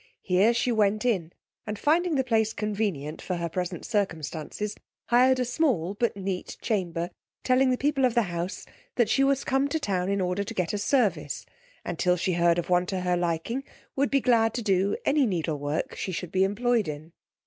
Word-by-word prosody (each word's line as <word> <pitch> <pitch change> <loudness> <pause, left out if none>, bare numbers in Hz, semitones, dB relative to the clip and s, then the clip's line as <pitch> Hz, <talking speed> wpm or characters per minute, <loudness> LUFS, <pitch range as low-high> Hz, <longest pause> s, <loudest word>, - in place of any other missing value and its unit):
Here 190 +5 +4
she 235 +1 +1
went 215 0 +2
in, 185 -9 0 0.4
and 210 0 -3
finding 325 - +2
the 265 - +2
place 225 -3 +1
convenient 200 -9 -2
for 185 - -3
her 170 -1 -2
present 180 0 -4
circumstances, 195 -1 -2 0.4
hired 255 +2 +5
a 250 - +1
small, 240 - 0
but 225 0 -1
neat 190 -2 -4
chamber, 175 -5 -2 0.3
telling 255 +1 +3
the 255 - +2
people 280 0 +1
of 250 -2 +3
the 235 - +4
house 175 -1 -4 0.3
that 240 -3 +2
she 275 - +3
was 275 0 +2
come 270 +1 +1
to 315 +3 -1
town 190 -8 -1
in 200 0 0
order 180 +2 0
to 225 +3 -7
get 180 +1 -1
a 205 - -1
service, 200 - 0 0.4
and - - -4
till 180 -1 +3
she 180 +1 0
heard 170 0 +3
of 175 - -2
one 180 0 +2
to 190 -1 -2
her 180 0 +1
liking, 175 +9 -1 0.3
would 280 +1 +1
be 275 -1 +2
glad 225 -3 +3
to 240 - -2
do 195 0 +2
any 280 -2 +3
needle 165 -6 -1
work 145 +2 -2
she 190 - -4
should 180 -1 -5
be 190 0 +3
employed 225 +2 +1
in. 155 +2 -7
200 Hz, 205 wpm, -27 LUFS, 180-245 Hz, 0.4 s, hired